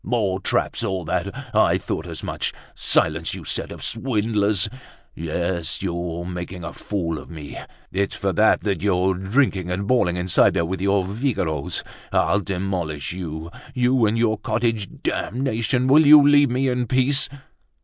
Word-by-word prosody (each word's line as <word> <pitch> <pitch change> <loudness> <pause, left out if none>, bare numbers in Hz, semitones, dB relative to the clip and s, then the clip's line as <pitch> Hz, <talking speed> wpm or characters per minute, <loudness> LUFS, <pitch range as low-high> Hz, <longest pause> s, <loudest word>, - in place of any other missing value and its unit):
"More 100 -4 0
traps, 95 - 0
all 95 -3 -2
that! - - -1 0.2
I - - +4
thought - - -4
as - - -7
much. - - -2 0.2
Silence, - - +1
you - - -8
set - - -2
of - - -8
swindlers! 105 -4 +1 0.5
Yes, 85 +2 -2
you're 85 -1 -3
making 90 0 -6
a 80 - -6
fool 85 -6 -3
of - - -12
me. 80 -4 -8 0.4
It's 100 +1 -1
for 95 -1 -1
that 110 +5 +4
that 100 -2 -1
you're 95 -1 +2
drinking 95 -1 0
and 90 +3 -2
bawling 100 -7 +2
inside 90 0 +3
there 85 - +1
with 95 +2 -4
your 100 -1 +2
viragoes. 95 - -2 0.3
I'll 100 - +2
demolish 90 -6 -3
you, 85 -2 -6 0.2
you 125 -2 +3
and 110 +2 0
your 110 -2 +1
cottage! 110 -3 -1
Damnation! 125 0 -1
Will 145 +3 +6
you 145 -1 +9
leave 145 -1 +5
me 130 +2 0
in 125 -1 0
peace?" 130 +3 +3
100 Hz, 160 wpm, -22 LUFS, 90-120 Hz, 0.5 s, you